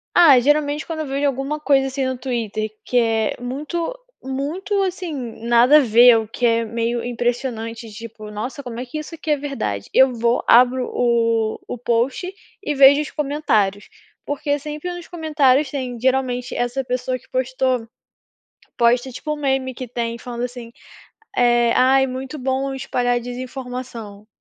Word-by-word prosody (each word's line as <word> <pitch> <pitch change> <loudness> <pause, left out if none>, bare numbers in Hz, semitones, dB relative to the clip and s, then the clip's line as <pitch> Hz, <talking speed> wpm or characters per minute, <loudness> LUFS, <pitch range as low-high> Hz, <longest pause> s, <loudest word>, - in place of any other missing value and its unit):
Ah, 295 -8 +8
geralmente 295 +2 +1
quando 320 -2 -4
eu - - -3
vejo 275 +1 0
alguma 275 +3 -2
coisa 270 -2 +3
assim 265 0 -2
no 260 -1 -2
Twitter 225 -4 -3
que 250 - -1
é 225 -2 +1
muito 305 - -4 0.3
muito, 320 +10 -2
assim, 365 -3 -3 0.3
nada 240 +5 +6
a - - +8
ver 240 -1 +6
o 220 -1 -2
que 240 +2 -2
é 230 0 +2
meio 230 +1 -2
impressionante. 235 -2 -3
Tipo: 215 0 -9
"Nossa, 245 +8 -5
como 240 -2 -7
é 255 - -4
que 255 +5 -7
isso 320 +2 -8
aqui 315 -1 -4
é 295 - +3
verdade?" 265 - -4
Eu 265 -1 +5
vou 235 +1 +1
abro 250 +1 +5
o 230 -2 +1
o - - -5
post 245 +9 0 0.3
e 295 - -2
vejo 280 +2 +7
os 300 - -6
comentários. 245 -10 0 0.4
Porque 290 0 -1
sempre 300 +4 -5
nos 350 -1 -9
comentários 300 -5 +2
tem, 255 -4 -4
geralmente, 255 -1 0
essa 245 +2 -1
pessoa 255 +1 -2
que - - -23
postou, 255 -2 -1 0.9
posta 245 +2 +2
tipo 300 +5 -5
um - - -8
meme 265 -2 0
que 255 0 -7
tem 235 0 -3
falando 240 0 -5
assim, 245 -2 -7 0.6
eh: 240 -1 +4
"Ai, 265 +1 +4
é - - 0
muito 260 +3 -6
bom 270 +1 -1
espalhar 245 -2 0
a - - +2
desinformação", 245 -4 -7
255 Hz, 165 wpm, -21 LUFS, 235-280 Hz, 0.9 s, Ah